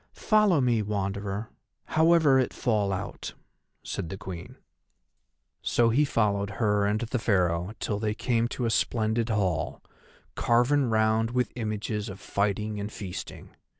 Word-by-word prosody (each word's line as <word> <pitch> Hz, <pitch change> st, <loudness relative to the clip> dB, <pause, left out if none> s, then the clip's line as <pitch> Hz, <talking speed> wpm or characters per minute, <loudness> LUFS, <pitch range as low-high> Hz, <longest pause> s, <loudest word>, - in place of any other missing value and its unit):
"Follow 210 Hz, -7 st, +3 dB
me, 120 Hz, -4 st, +2 dB
Wanderer, 100 Hz, +1 st, -3 dB, 0.3 s
however 160 Hz, -4 st, +4 dB
it 130 Hz, -, 0 dB
fall 105 Hz, -5 st, +1 dB
out," 95 Hz, 0 st, -5 dB, 0.5 s
said 80 Hz, -, -4 dB
the 95 Hz, -, -5 dB
Queen. 95 Hz, -4 st, -8 dB, 1.0 s
So 120 Hz, -1 st, +2 dB
he 140 Hz, +6 st, +3 dB
followed 100 Hz, -6 st, +1 dB
her 105 Hz, -3 st, +2 dB
and 105 Hz, +1 st, 0 dB
the 120 Hz, +1 st, -2 dB
Pharaoh 90 Hz, -3 st, +1 dB
till 105 Hz, -2 st, -2 dB
they 105 Hz, -1 st, -1 dB
came 120 Hz, -1 st, +1 dB
to 120 Hz, 0 st, -3 dB
a 115 Hz, -, +1 dB
splendid 110 Hz, +1 st, 0 dB
hall, 95 Hz, -7 st, -1 dB, 0.5 s
carven 125 Hz, +3 st, +2 dB
round 110 Hz, 0 st, +2 dB
with 125 Hz, +1 st, -1 dB
images 110 Hz, -1 st, -3 dB
of 95 Hz, +1 st, -8 dB
fighting 105 Hz, +1 st, -1 dB
and 100 Hz, +1 st, -4 dB
feasting. 95 Hz, -4 st, -8 dB
110 Hz, 140 wpm, -27 LUFS, 100-120 Hz, 1.0 s, however